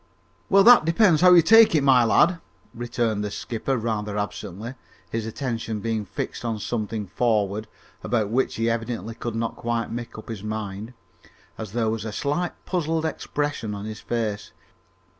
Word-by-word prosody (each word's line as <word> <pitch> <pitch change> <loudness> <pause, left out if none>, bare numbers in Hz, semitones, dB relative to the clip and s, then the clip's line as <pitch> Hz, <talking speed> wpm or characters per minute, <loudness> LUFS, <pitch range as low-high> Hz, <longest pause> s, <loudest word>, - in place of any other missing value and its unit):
"Well, 195 0 +6
that 240 -2 +8
depends 165 0 +4
how 180 0 +7
you 170 - +7
take 225 +1 +7
it, 150 - +3
my 130 -3 +5
lad," 165 +10 +3 0.3
returned 115 -3 -2
the 105 - -2
skipper 120 +5 -3
rather 105 -2 -2
absently, 105 +2 -5 0.4
his 115 -1 -2
attention 115 -2 -3
being 110 0 -2
fixed - - -5
on 115 -2 -2
something 110 -1 -3
forward, 105 0 0 0.4
about 110 -4 0
which 130 +3 0
he 115 0 0
evidently 115 -2 -2
could 115 0 -5
not 115 0 -2
quite 115 0 -2
make 120 0 -6
up 110 - -10
his 110 -4 -5
mind, 105 +2 -5 0.6
as 110 -3 -7
there 115 -1 0
was 110 -1 -3
a 110 - -4
slight 150 +10 -2
puzzled 165 -3 -1
expression 145 -7 -3
on 100 0 -6
his 110 0 -6
face. 110 -3 -3
115 Hz, 165 wpm, -24 LUFS, 110-130 Hz, 0.6 s, that